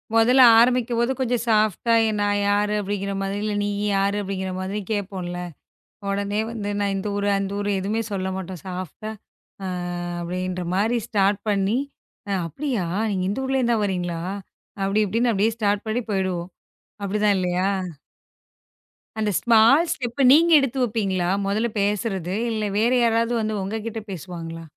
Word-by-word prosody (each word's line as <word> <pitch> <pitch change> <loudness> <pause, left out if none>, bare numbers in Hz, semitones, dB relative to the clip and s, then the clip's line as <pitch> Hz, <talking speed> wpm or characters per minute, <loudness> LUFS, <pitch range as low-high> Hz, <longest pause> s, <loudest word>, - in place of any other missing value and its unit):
முதல்ல 250 +3 +6 0.2
ஆரம்பிக்கும்போது 240 0 +2
கொஞ்சம் 245 -2 0
சாஃப்ட்டா 215 +1 +3 0.2
நான் 205 0 +1
யாரு 205 +1 +2
அப்படிங்கற 200 0 -3
மாதிரி 195 +1 -2
இல்ல. 210 -1 -1
நீ - - 0 0.3
யாரு 200 +1 +1
அப்படிங்கற 190 -1 -3
மாதிரி 195 +3 -3
கேப்போம்ல. 185 -4 -3 0.7
உடனே 200 +1 -1
வந்து 210 -3 -4
நான் 200 -1 0
இந்த 195 +2 -3
ஊர், 205 0 -1
அந்த 195 0 -3
ஊர் 205 0 -2
எதுவுமே 205 +4 -1
சொல்லமாட்டோம். 190 -2 -4
சாஃப்ட்டா, 185 +3 -6 0.5
அ, - - -3 0.5
அப்படின்ற 180 +1 -3
மாதிரி 220 +5 +2
ஸ்டார்ட் 200 -1 +2
பண்ணி, 200 +4 +1 0.7
"அப்படியா? 240 - -2 0.4
இந்த 200 +6 -2
ஊர்ல 265 0 0
இருந்து 240 -1 +2
தான் 215 - 0
வரீங்களா?" 175 -3 -2 0.6
அப்படி 195 +2 +1
இப்படின்னு 230 +5 +1
அப்படியே 215 +3 +1
ஸ்டார்ட் 205 -1 0
பண்ணி 220 +3 0
போயிடுவோம். 185 -3 -1 0.5
அப்படித்தான் 205 +1 +2
இல்லையா? 180 +1 0 1.5
அந்த 210 -1 +1
ஸ்மால் 235 +8 +5
ஸ்டெப் 255 -1 -4
நீங்க 335 +4 +6
எடுத்து 270 -1 -1
வைப்பீங்களா? 195 -6 0 0.2
முதல்ல 215 +4 0
பேசுறது 200 -3 -1 0.2
இல்ல. 215 -1 -2 0.2
வேற 235 +3 +3
யாராவது 230 +1 +2
வந்து 215 0 -1
உங்ககிட்ட 220 +3 -4
பேசுவாங்களா? 165 -2 -7
205 Hz, 140 wpm, -23 LUFS, 190-225 Hz, 1.5 s, முதல்ல